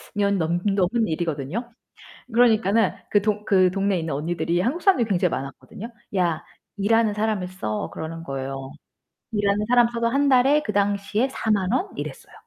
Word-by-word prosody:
년 200 Hz, -1 st, +2 dB
넘 170 Hz, +1 st, 0 dB
넘은 200 Hz, +3 st, +1 dB
일이거든요. 165 Hz, -, -3 dB, 0.6 s
그러니까는 225 Hz, -3 st, +3 dB, 0.2 s
그 205 Hz, -, +4 dB
동 210 Hz, 0 st, -1 dB
그 185 Hz, -3 st, +4 dB
동네에 195 Hz, -1 st, 0 dB
있는 160 Hz, -3 st, -3 dB
언니들이 170 Hz, +3 st, -1 dB
한국 260 Hz, -, -1 dB
사람들이 275 Hz, -, +3 dB
굉장히 180 Hz, -3 st, +1 dB
많았거든요. 140 Hz, -, -6 dB, 0.3 s
"야, 170 Hz, -4 st, 0 dB, 0.3 s
일하는 215 Hz, +1 st, +2 dB
사람을 210 Hz, -3 st, -1 dB
써." 180 Hz, -, -4 dB
그러는 165 Hz, +1 st, -6 dB
거예요. 135 Hz, -2 st, -5 dB, 0.6 s
일하는 205 Hz, -1 st, +1 dB
사람을 240 Hz, -1 st, +4 dB
써도 235 Hz, 0 st, 0 dB
1 280 Hz, +4 st, +2 dB
달에 270 Hz, +3 st, +4 dB
그 210 Hz, -, -3 dB
당시에 205 Hz, +4 st, 0 dB
40,000 210 Hz, -7 st, 0 dB
원? 390 Hz, -, 0 dB
이랬어요. -, -, -7 dB
200 Hz, 350 characters per minute, -23 LUFS, 175-230 Hz, 0.6 s, 그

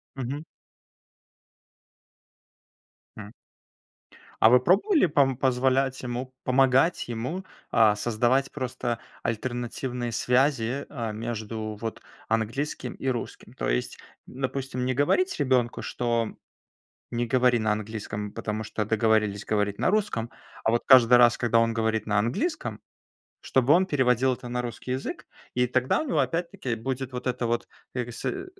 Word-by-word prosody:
Мгм. 135 Hz, +4 st, -4 dB, 2.7 s
М. 105 Hz, -1 st, -8 dB, 1.1 s
А 110 Hz, -, +8 dB
вы 125 Hz, +2 st, +7 dB
пробовали, 195 Hz, -, +3 dB
пом 140 Hz, -3 st, +3 dB
позволять 130 Hz, 0 st, +1 dB
ему 125 Hz, +1 st, -4 dB
помогать 135 Hz, +5 st, +3 dB
ему, 125 Hz, +11 st, -4 dB, 0.3 s
а, 110 Hz, -2 st, +5 dB
создавать 120 Hz, +5 st, +1 dB
просто 125 Hz, -3 st, -3 dB, 0.2 s
альтернативные 120 Hz, +1 st, -3 dB
связи, 125 Hz, +1 st, +1 dB
а, 115 Hz, -6 st, -4 dB
между 110 Hz, -1 st, -4 dB
вот 115 Hz, -1 st, -4 dB, 0.3 s
английским 115 Hz, +6 st, -2 dB
и -, -, -6 dB
русским? 120 Hz, -3 st, -4 dB
То -, -, -3 dB
есть, -, -, -1 dB, 0.3 s
допустим, 130 Hz, -1 st, -3 dB
не 130 Hz, -, +1 dB
говорить 145 Hz, -, +2 dB
ребенку, 130 Hz, -4 st, +1 dB
что 115 Hz, -2 st, -1 dB, 0.8 s
не 120 Hz, 0 st, -1 dB
говори 125 Hz, 0 st, +3 dB
на 110 Hz, -1 st, +1 dB
английском, 105 Hz, -1 st, -5 dB
потому 110 Hz, 0 st, -4 dB
что 105 Hz, 0 st, -3 dB
договорились 110 Hz, -2 st, +1 dB
говорить 105 Hz, -1 st, 0 dB
на -, -, +2 dB
русском, 195 Hz, -, 0 dB, 0.3 s
а -, -, +3 dB
вот 120 Hz, +1 st, +1 dB
каждый 125 Hz, -2 st, +8 dB
раз, 120 Hz, -1 st, +6 dB
когда 120 Hz, -1 st, +2 dB
он 115 Hz, 0 st, +2 dB
говорит 110 Hz, -1 st, 0 dB
на 105 Hz, -1 st, +1 dB
английском, 310 Hz, -, -1 dB, 0.6 s
чтобы 130 Hz, +2 st, +3 dB
он 180 Hz, +3 st, +4 dB
переводил 130 Hz, -4 st, +2 dB
это 125 Hz, -, -10 dB
на 125 Hz, 0 st, -2 dB
русский 120 Hz, +1 st, -6 dB
язык. 130 Hz, +1 st, -4 dB, 0.3 s
И 125 Hz, 0 st, +2 dB
тогда 130 Hz, +1 st, +1 dB
у 310 Hz, -, -3 dB
него, 160 Hz, -, +1 dB
опять-таки, 165 Hz, 0 st, -1 dB
будет 130 Hz, +3 st, -4 dB
вот 125 Hz, 0 st, -5 dB
это 125 Hz, -1 st, -1 dB
вот, 120 Hz, 0 st, -1 dB, 0.3 s
как 125 Hz, -1 st, -2 dB
бы, 120 Hz, -, -8 dB
сэ -, -, -3 dB
э, 380 Hz, 0 st, -5 dB
125 Hz, 140 wpm, -26 LUFS, 115-135 Hz, 2.7 s, А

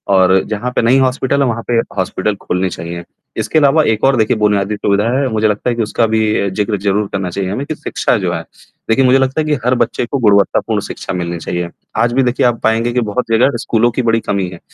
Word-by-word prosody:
और 95 Hz, 0 st, +5 dB
जहाँ 110 Hz, +3 st, -3 dB
पे -, -, 0 dB
नहीं 125 Hz, +4 st, +4 dB
हॉस्पिटल 130 Hz, +1 st, +1 dB
है 140 Hz, -, +3 dB
वहाँ 115 Hz, -1 st, -2 dB
पे 120 Hz, -, -1 dB, 0.2 s
हॉस्पिटल 95 Hz, +2 st, -1 dB
खोलने 90 Hz, +1 st, -1 dB
चाहिए। 85 Hz, 0 st, -6 dB, 0.3 s
इसके -, -, -1 dB
अलावा 150 Hz, +2 st, +4 dB
एक 110 Hz, -5 st, 0 dB
और 135 Hz, 0 st, +4 dB
देखिए 110 Hz, +2 st, +2 dB
बुनियादी 105 Hz, -1 st, +1 dB
सुविधा 100 Hz, 0 st, +1 dB
है, 140 Hz, -, +1 dB
मुझे 110 Hz, -1 st, +1 dB
लगता 105 Hz, +3 st, -1 dB
है 120 Hz, -, -1 dB
कि 115 Hz, -, -1 dB
उसका 110 Hz, +2 st, 0 dB
भी 110 Hz, -2 st, +1 dB
जिक्र 105 Hz, +2 st, -1 dB
ज़रूर 100 Hz, +1 st, 0 dB
करना 95 Hz, -3 st, -2 dB
चाहिए 95 Hz, +1 st, -3 dB
हमें 135 Hz, +7 st, -3 dB
कि 155 Hz, -, -4 dB
शिक्षा 125 Hz, -, -1 dB
जो 90 Hz, -3 st, -2 dB
है। 85 Hz, -, -3 dB, 0.5 s
देखिए 130 Hz, +4 st, +3 dB
मुझे 130 Hz, +1 st, +5 dB
लगता 135 Hz, +3 st, 0 dB
है 155 Hz, -, -2 dB
कि 150 Hz, -, 0 dB
हर 125 Hz, -, +3 dB
बच्चे 120 Hz, 0 st, 0 dB
को 140 Hz, +4 st, -2 dB
गुणवत्तापूर्ण 100 Hz, -4 st, +2 dB
शिक्षा -, -, -6 dB
मिलनी 85 Hz, -1 st, -3 dB
चाहिए। 85 Hz, +1 st, -3 dB, 0.3 s
आज 120 Hz, +1 st, +2 dB
भी 135 Hz, +1 st, +2 dB
देखिए 125 Hz, 0 st, +1 dB
आप 120 Hz, -1 st, +1 dB
पाएँगे 115 Hz, +2 st, +1 dB
कि 125 Hz, -, +1 dB
बहुत 110 Hz, +3 st, -2 dB
जगह 125 Hz, +5 st, +3 dB
स्कूलों 115 Hz, +1 st, +1 dB
की 125 Hz, -, -1 dB
बड़ी 115 Hz, -1 st, +2 dB
कमी 100 Hz, -3 st, -2 dB
है 90 Hz, -1 st, -11 dB
110 Hz, 240 wpm, -15 LUFS, 100-125 Hz, 0.5 s, और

